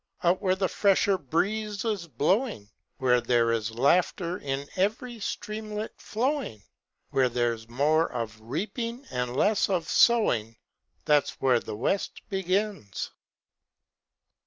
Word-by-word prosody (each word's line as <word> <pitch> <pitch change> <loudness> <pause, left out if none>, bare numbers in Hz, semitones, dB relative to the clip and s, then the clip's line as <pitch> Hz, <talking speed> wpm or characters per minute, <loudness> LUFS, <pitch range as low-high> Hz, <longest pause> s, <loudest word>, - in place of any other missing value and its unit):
Out 175 +1 +3
where 185 -1 +2
a 190 - +2
fresher 200 0 +3
breeze 200 - -1
is 205 -6 -1
blowing, 165 - 0 0.3
Where 125 -2 +3
there 120 -1 +2
is 115 -1 0
laughter 175 +5 +2
in 140 0 -3
every 225 +5 -1
streamlet 215 +1 -4
flowing, 245 - -2 0.5
Where 130 -2 +3
there's 115 -2 -1
more 150 +6 +2
of 115 -3 -5
reaping 230 - -4
and 125 0 -2
less 210 +4 +3
of 175 -4 0
sowing, 115 - +3 0.5
That's 150 -2 +2
where 130 -3 +3
the 105 - -6
West 135 - -1
begins. 190 - -2
170 Hz, 120 wpm, -27 LUFS, -, 0.5 s, Out